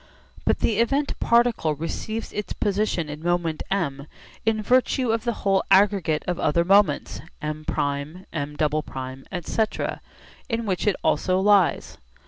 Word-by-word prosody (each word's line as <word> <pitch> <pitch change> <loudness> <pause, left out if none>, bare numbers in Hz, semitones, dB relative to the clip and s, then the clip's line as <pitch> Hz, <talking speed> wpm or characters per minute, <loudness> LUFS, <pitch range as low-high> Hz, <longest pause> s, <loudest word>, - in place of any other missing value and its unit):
But - - +1
the 220 -2 +1
event 275 +5 +1
particle 235 -10 +2
receives 215 +8 -4
its 210 - -4
position 200 -5 0
in 150 +1 -7
moment 170 -2 0
M 145 -8 -2 0.4
in 220 -1 +2
virtue 255 +1 +2
of 225 +1 -1
the 235 - +2
whole 195 -1 +3
aggregate 190 -6 +3
of 180 -1 -1
other 170 +3 +2
moments 195 -5 +3 0.2
M{'}, 155 0 -4
M{''}, 145 -3 -3
etc., 190 +4 -2 0.5
in 230 -1 -1
which 190 0 -1
it 205 - +3
also 185 0 +2
lies. 200 -2 +2
185 Hz, 130 wpm, -24 LUFS, 155-215 Hz, 0.5 s, whole